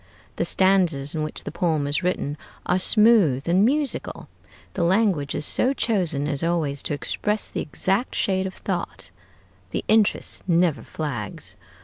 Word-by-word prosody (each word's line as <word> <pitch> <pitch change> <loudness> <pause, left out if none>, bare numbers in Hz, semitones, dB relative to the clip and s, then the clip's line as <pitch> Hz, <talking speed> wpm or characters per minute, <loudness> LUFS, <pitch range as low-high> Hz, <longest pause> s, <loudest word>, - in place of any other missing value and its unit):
The - - 0
stanzas 175 -7 +2
in 160 - -2
which 155 0 -5
the - - -6
poem 160 -3 0
is 145 +4 +1
written 175 -5 -1 0.3
are 180 - +1
smooth 200 - +4
and 180 +4 +4
musical, 285 +4 -1 0.5
the 185 - -3
language 175 -5 +1
is 150 - -1
so 260 - +1
chosen 175 - 0
as 145 -2 -2
always 160 -5 0
to 145 - -2
express 210 +8 -2
the - - -4
exact 195 - -1
shade 190 -1 0
of 185 - -8
thought, - - -4 0.6
the - - -4
interest 215 -3 +1
never 170 -3 +2
flags. 125 -10 -4
175 Hz, 150 wpm, -23 LUFS, 145-195 Hz, 0.6 s, smooth